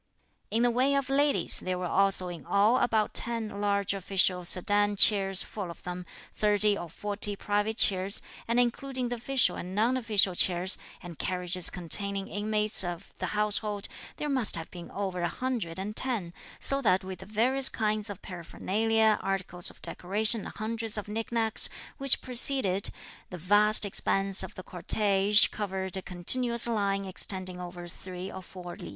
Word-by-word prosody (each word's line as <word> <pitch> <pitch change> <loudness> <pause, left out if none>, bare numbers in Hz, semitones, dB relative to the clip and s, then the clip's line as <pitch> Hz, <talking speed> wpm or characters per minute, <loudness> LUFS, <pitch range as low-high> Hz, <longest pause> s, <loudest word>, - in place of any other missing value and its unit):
In 230 +2 0
the 245 - +3
way 260 +4 +1
of 275 -1 -2
ladies, 285 +1 +2
there 185 0 -4
were 180 - -4
also 195 +1 +1
in 175 -3 -8
all 205 +8 +2
about 220 -3 0
ten 230 -2 +1
large 200 -1 0
official 190 -1 0
sedan 205 +4 +3
chairs 195 -2 +4
full 200 -5 -7
of 170 - -11
them, 180 0 -7 0.3
thirty 210 0 +2
or 175 - -7
forty 205 +3 0
private 205 +2 -2
chairs, 190 +1 +2 0.2
and 235 +1 +1
including 250 +1 -1
the 245 - -4
official 265 +2 0
and 180 +2 -7
non 230 +5 +1
official 215 -6 +1
chairs, 180 +1 +4 0.2
and 175 -3 -10
carriages 180 -1 +1
containing 195 +3 +2
inmates 210 0 +2
of 175 +1 -7
the - - -3
household, 210 -1 0 0.3
there 300 - -4
must 260 -6 +1
have 165 -1 -6
been 175 -1 -10
over 190 -3 -4
a 175 - 0
hundred 235 -10 -4
and 205 +3 -6
ten; 225 -11 -1 0.3
so 275 0 +1
that 190 -6 +2
with 185 -1 -8
the 190 - -12
various 255 +6 +3
kinds 215 -1 -2
of 200 - -9
paraphernalia, 215 +5 0
articles 190 -2 -1
of - - -18
decoration 210 +4 -1
and - - -11
hundreds 225 0 0
of 210 - -5
nick 220 +2 -5
nacks, 225 -2 +3 0.3
which 275 -1 +1
preceded, 245 -6 +3 0.4
the 180 - -8
vast 205 +5 +3
expanse 195 0 -1
of 190 - -3
the 185 - -9
cortege 200 +3 +2
covered 190 -3 -3
a 190 - -3
continuous 235 +7 +2
line 200 -4 -1
extending 185 -1 -1
over 175 0 -9
three 185 +1 -8
or 190 - -8
four 180 -1 -10
li. - - -10
205 Hz, 170 wpm, -28 LUFS, 185-225 Hz, 0.4 s, chairs